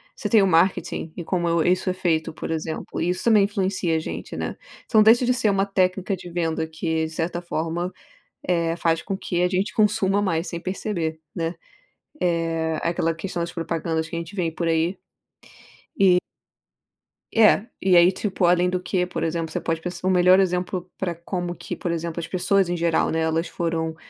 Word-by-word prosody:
Você - - -4
tem 220 -3 +6
o 195 - +4
marketing, 165 -2 +1
e 175 - -5
como 175 0 -1
eu, 170 -1 +2
isso 185 +1 +2
é - - -2
feito, 170 -4 0
por - - -6
exemplo, 160 0 -4
isso 180 +2 -1
também 220 -3 +5
influencia 190 -4 0
a - - 0
gente, - - -6
né. - - -3 0.3
Então 215 -2 +5
deixa 230 +3 +6
de 250 - +3
ser 230 -4 +2
uma 195 0 +2
técnica 190 0 0
de 180 -1 -10
venda 165 -2 -1
que, 160 0 -2
de - - -5
certa 170 +2 -2
forma, 170 +1 -3 0.6
eh, 170 -2 +1
faz 165 -1 +1
com 195 - -3
que 175 -2 -2
a 180 - +3
gente 190 +4 -1
consuma 205 -2 +2
mais 170 -3 0
sem 170 - -5
perceber, 170 -4 -3
né. 165 0 -2 0.7
É 165 -2 0
aquela 165 -1 0
questão 175 +2 -5
das 170 - -4
propagandas 165 -1 -2
que 170 - -5
a - - -1
gente 170 +3 -7
vê 175 -4 -1
por 170 +1 -3
aí. 165 +3 +1 1.0
E 185 -2 +6 1.2
É, 220 -1 +5 0.2
e 185 -2 +5
aí, 175 +2 +7
tipo, 190 -1 -1
além 175 +1 +4
do 180 0 -1
que, 180 0 0
por 180 - -4
exemplo, 165 0 -2
você - - -2
pode 165 -1 -2
p 180 - -3
o 185 - +2
melhor 185 0 +5
exemplo 180 -1 -1
para 180 -3 -2
como 175 +1 -4
que, - - -6
por 175 - -3
exemplo, 170 0 -3
as 165 - -5
pessoas 185 0 +1
em 175 - -1
geral, 165 -1 +1
né. 160 - 0
Elas 160 +1 0
foram, 165 -1 -2
175 Hz, 200 wpm, -23 LUFS, 165-185 Hz, 1.2 s, aí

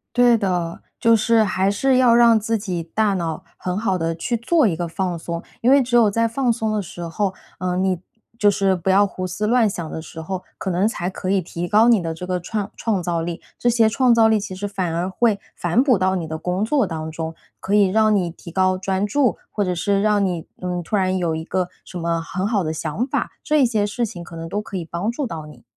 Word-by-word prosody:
对 245 -1 +5
的， 180 -5 -2 0.2
就 230 0 +5
是 225 +1 +3
还 190 -1 +1
是 260 +6 +2
要 250 -2 +5
让 235 -1 +6
自 225 +1 0
己 185 -5 -3
大 205 +5 0
脑 165 -4 -3
很 180 0 -3
好 200 -3 0
地 165 -1 -1
去 170 +9 -2
做 260 +4 +2
一 175 - 0
个 175 - -2
放 180 0 -2
松。 170 0 -5 0.2
因 245 - +4
为 280 0 +6
只 245 -1 -1
有 225 -3 +5
在 230 +2 +2
放 245 +2 0
松 220 -1 -1
的 210 - 0
时 175 -1 -9
候， 190 +3 -1 0.3
呃， 180 0 -1
你 185 -1 +1 0.4
就 205 -2 +4
是 195 -1 +2
不 180 +1 -3
要 200 +2 +5
胡 185 -1 -5
思 185 +4 -2
乱 230 -1 +4
想 170 -5 -5
的 160 - -5
时 160 0 -9
候， 185 +3 -5
可 - - -4
能 180 +2 +1
才 180 -5 -1
可 185 0 -5
以 195 -1 +2
提 170 0 -5
高 215 +5 +4
你 230 -5 +5
的 165 -1 -3
这 180 +3 -7
个 180 -1 -1
创 205 +2 -3
创 210 -5 -1
造 170 -1 -1
力， 170 0 -4 0.2
这 240 - +1
些 230 -2 +4
创 245 +2 +3
造 225 -1 +5
力 220 -1 +4
其 195 -2 -5
实 195 +2 -4
反 185 -4 -2
而 175 +3 -1
会 210 +1 +1 0.2
反 175 +8 +2
哺 260 -5 +4
到 190 0 +1
你 165 -3 -4
的 160 0 -4
工 180 +5 -1
作 270 0 +2
当 160 -3 -5
中， 160 0 -5 0.3
可 195 - -2
以 205 -1 +6
让 215 +2 +3
你 185 -4 +1
提 170 0 -11
高 185 +1 +2
专 190 +2 -1
注， 255 +3 +2
或 205 - -1
者 180 -2 -1
是 195 +3 +1
让 210 -1 +3
你， 175 -4 -2 0.2
嗯， 180 -1 -3
突 210 +6 -1
然 185 -1 +1
有 170 -3 0
一 160 0 -4
个 180 0 -1 0.2
什 180 - -8
么 170 -1 -1
很 185 +3 -3
好 205 -4 0
的 155 - -1
想 160 - -2
法， - - -2
这 300 -3 +4
些 220 -4 +1
事 235 +3 -1
情 180 -5 -8
可 170 0 -10
能 165 0 -6
都 205 - -2
可 210 - -9
以 180 - -2
帮 170 +6 -3
助 270 +5 -2
到 165 -9 -6
你。 150 -1 -14
190 Hz, 275 characters per minute, -21 LUFS, 175-220 Hz, 0.4 s, 让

